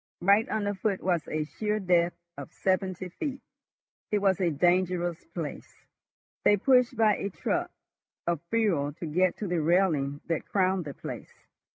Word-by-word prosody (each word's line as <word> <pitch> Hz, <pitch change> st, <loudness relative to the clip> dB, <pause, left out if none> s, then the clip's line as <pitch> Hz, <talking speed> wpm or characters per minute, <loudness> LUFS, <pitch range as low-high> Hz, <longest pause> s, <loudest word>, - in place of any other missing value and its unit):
Right 200 Hz, +5 st, +4 dB
under 205 Hz, -2 st, -1 dB
foot 200 Hz, 0 st, -2 dB
was 175 Hz, -3 st, 0 dB
a 155 Hz, 0 st, -1 dB
sheer 210 Hz, +7 st, -2 dB
depth 175 Hz, -3 st, +2 dB, 0.2 s
of -, -, -9 dB
seventy 185 Hz, -1 st, -1 dB
feet. 275 Hz, -, -4 dB, 0.7 s
It 210 Hz, -, +2 dB
was 195 Hz, -2 st, +2 dB
a 175 Hz, -, +3 dB
dangerous 175 Hz, +1 st, +1 dB
place. -, -, -7 dB, 0.6 s
They 205 Hz, -, +5 dB
pushed 250 Hz, +2 st, +3 dB
by 215 Hz, -2 st, +4 dB
a 200 Hz, -, -3 dB
truck 185 Hz, -, -2 dB, 0.6 s
of 170 Hz, -3 st, 0 dB
fuel 180 Hz, -11 st, +1 dB
to 170 Hz, -, -7 dB
get 180 Hz, +3 st, +1 dB
to 210 Hz, -, -4 dB
the 175 Hz, -2 st, 0 dB
railing 155 Hz, -4 st, +2 dB
that 165 Hz, -2 st, -2 dB
crowned 185 Hz, -2 st, +1 dB
the 140 Hz, -3 st, -7 dB
place. -, -, -9 dB
185 Hz, 160 wpm, -28 LUFS, 170-205 Hz, 0.7 s, They